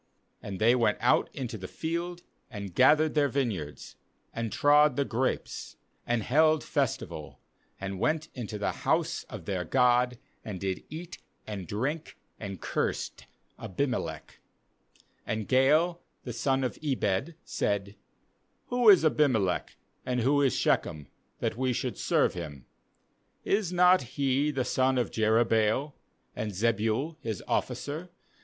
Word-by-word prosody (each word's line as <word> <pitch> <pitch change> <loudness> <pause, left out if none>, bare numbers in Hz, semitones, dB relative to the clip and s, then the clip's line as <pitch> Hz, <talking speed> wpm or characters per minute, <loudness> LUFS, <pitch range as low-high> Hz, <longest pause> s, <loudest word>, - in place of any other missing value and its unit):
27And 100 -2 -5
they 115 +5 +4
went 120 -2 +2
out - - +3
into 120 -4 -5
the 95 - -6
field, 170 - -4 0.3
and 100 -6 -7
gathered 155 - +5
their 145 -2 +3
vineyards, 110 - -3 0.4
and 115 -2 -3
trod 145 -1 +5
the 140 - +1
grapes, 130 +1 -2 0.3
and 120 -2 +1
held 155 +5 +3
festival, - - -3 0.4
and 95 -1 -4
went 155 +5 0
into 110 -4 -5
the 100 - -1
house - - 0
of - - -9
their 95 -3 -2
god, 125 +1 +3 0.3
and 100 -4 -6
did 95 -1 -3
eat 170 +3 -8 0.3
and 100 -5 -6
drink, 140 +10 -3 0.2
and 100 -4 -6
cursed - - -2 0.3
Abimelech. 95 - -3 0.9
28And 110 -1 -2
Gaal 150 - +3 0.3
the 120 - -5
son 135 +3 +1
of 125 - -3
Ebed 135 - 0
said: 100 0 -2 0.7
'Who 245 -2 +5
is 185 -5 +7
Abimelech, 125 - +2 0.3
and 125 -1 -1
who 140 +4 +3
is 135 -2 +2
Shechem, 75 -2 0 0.3
that - - -2
we 130 0 +1
should - - -3
serve - - +2
him? 75 -7 -7 0.8
is 200 -3 +1
not 180 +1 +5
he 135 +3 0
the 135 -4 -1
son 130 0 +2
of 125 - 0
Jerubbaal? 110 +4 +2 0.4
and 105 -1 -3
Zebul 115 - 0
his 110 -5 -4
officer? 155 +5 -2
125 Hz, 135 wpm, -29 LUFS, 105-150 Hz, 0.9 s, is